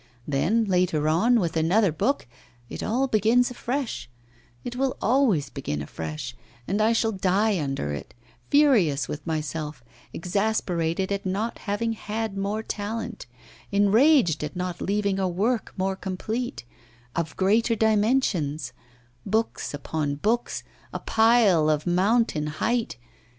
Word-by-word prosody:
Then, 190 Hz, +11 st, +2 dB
later 180 Hz, -6 st, +1 dB
on, 225 Hz, +10 st, +4 dB
with 170 Hz, -5 st, -1 dB
another 175 Hz, +5 st, +3 dB
book, 265 Hz, -, 0 dB, 0.4 s
it -, -, -6 dB
all 255 Hz, +5 st, +1 dB
begins 235 Hz, +2 st, +3 dB
afresh; 250 Hz, -, -3 dB, 0.5 s
it 245 Hz, -, -5 dB
will 265 Hz, 0 st, -1 dB
always 215 Hz, -, +2 dB
begin 75 Hz, -, -4 dB
afresh, 80 Hz, +10 st, -6 dB, 0.3 s
and 205 Hz, +3 st, 0 dB
I 220 Hz, +1 st, +4 dB
shall 225 Hz, -1 st, +2 dB
die 195 Hz, 0 st, +1 dB
under 135 Hz, -, -2 dB
it, 75 Hz, -, -8 dB, 0.3 s
furious 225 Hz, -, +4 dB
with 150 Hz, -, -6 dB
myself, 155 Hz, -3 st, -3 dB, 0.3 s
exasperated 185 Hz, -2 st, -1 dB
at 200 Hz, 0 st, -1 dB
not 200 Hz, +5 st, -2 dB
having 225 Hz, +3 st, 0 dB
had 220 Hz, -1 st, -4 dB
more 200 Hz, +3 st, -2 dB
talent, 220 Hz, -, -5 dB, 0.4 s
enraged 205 Hz, -, +4 dB
at 150 Hz, -, -5 dB
not 180 Hz, -1 st, -4 dB
leaving 200 Hz, -1 st, 0 dB
a 190 Hz, -, +1 dB
"work" 215 Hz, +7 st, 0 dB
more 190 Hz, +1 st, 0 dB
complete, 215 Hz, -, -4 dB, 0.5 s
of 165 Hz, -3 st, -3 dB
greater 220 Hz, +4 st, +3 dB
dimensions 205 Hz, -, +1 dB, 0.5 s
books 220 Hz, +3 st, -1 dB
upon 145 Hz, 0 st, -2 dB
books, 220 Hz, +11 st, -1 dB, 0.3 s
a -, -, -3 dB
pile 220 Hz, -8 st, +4 dB
of 150 Hz, -1 st, +1 dB
mountain 185 Hz, -2 st, +2 dB
height! 225 Hz, -, -1 dB
200 Hz, 130 wpm, -25 LUFS, 160-225 Hz, 0.5 s, on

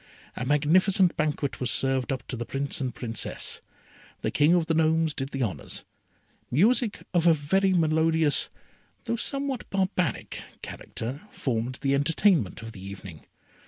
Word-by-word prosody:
A 125 Hz, -, -3 dB
magnificent 175 Hz, +6 st, +4 dB
banquet 150 Hz, -3 st, -1 dB
was 125 Hz, -, 0 dB
served 135 Hz, +1 st, +1 dB
up 130 Hz, -1 st, -3 dB
to -, -, -2 dB
the 120 Hz, -, -3 dB
Prince 135 Hz, +4 st, -3 dB
and 125 Hz, -3 st, -2 dB
Princess. 115 Hz, -3 st, -3 dB, 0.6 s
The -, -, 0 dB
King 150 Hz, +4 st, +4 dB
of 170 Hz, -2 st, +2 dB
the 165 Hz, -, 0 dB
Gnomes 160 Hz, 0 st, +2 dB
did 135 Hz, -1 st, -4 dB
the 135 Hz, -2 st, -2 dB
honours. 95 Hz, -, -4 dB, 0.6 s
Music 215 Hz, -, +2 dB
of 175 Hz, -1 st, +3 dB
a 165 Hz, -, +7 dB
very 190 Hz, +6 st, +2 dB
melodious, 160 Hz, -2 st, +3 dB, 0.5 s
though 230 Hz, -, -1 dB
somewhat 275 Hz, +1 st, -3 dB
barbaric, 185 Hz, -, -1 dB, 0.2 s
character, 130 Hz, -, -6 dB
formed 125 Hz, 0 st, -2 dB
the 135 Hz, 0 st, +2 dB
entertainment 145 Hz, -, +2 dB
of 115 Hz, -, -7 dB
the 95 Hz, -3 st, -11 dB
evening. 95 Hz, -4 st, -9 dB
150 Hz, 150 wpm, -27 LUFS, 130-175 Hz, 0.6 s, a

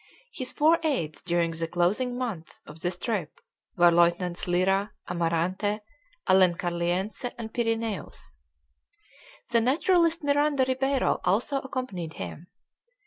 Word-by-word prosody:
His 255 Hz, -1 st, -3 dB
four 320 Hz, +3 st, +4 dB
aides 255 Hz, -, -1 dB
during 170 Hz, -1 st, 0 dB
the 165 Hz, 0 st, -3 dB
closing 205 Hz, +9 st, 0 dB
months 220 Hz, -11 st, -5 dB
of 155 Hz, +2 st, -12 dB
this 175 Hz, 0 st, -1 dB
trip 190 Hz, -6 st, -3 dB, 0.4 s
were 175 Hz, 0 st, +6 dB
Lieutenants 175 Hz, +1 st, +2 dB
Lyra, 195 Hz, +3 st, +1 dB
Amarante, 175 Hz, +5 st, 0 dB, 0.5 s
Alencarliense, 180 Hz, +4 st, +1 dB
and 225 Hz, -1 st, -7 dB
Pyrineus. 225 Hz, -, -2 dB, 1.1 s
The 235 Hz, -1 st, +4 dB
naturalist 330 Hz, +6 st, +3 dB
Miranda 285 Hz, -1 st, +2 dB
Ribeiro 270 Hz, +1 st, +1 dB
also 235 Hz, +9 st, +1 dB
accompanied 255 Hz, -, -5 dB
him. 95 Hz, -, -7 dB
195 Hz, 110 wpm, -27 LUFS, 175-255 Hz, 1.1 s, were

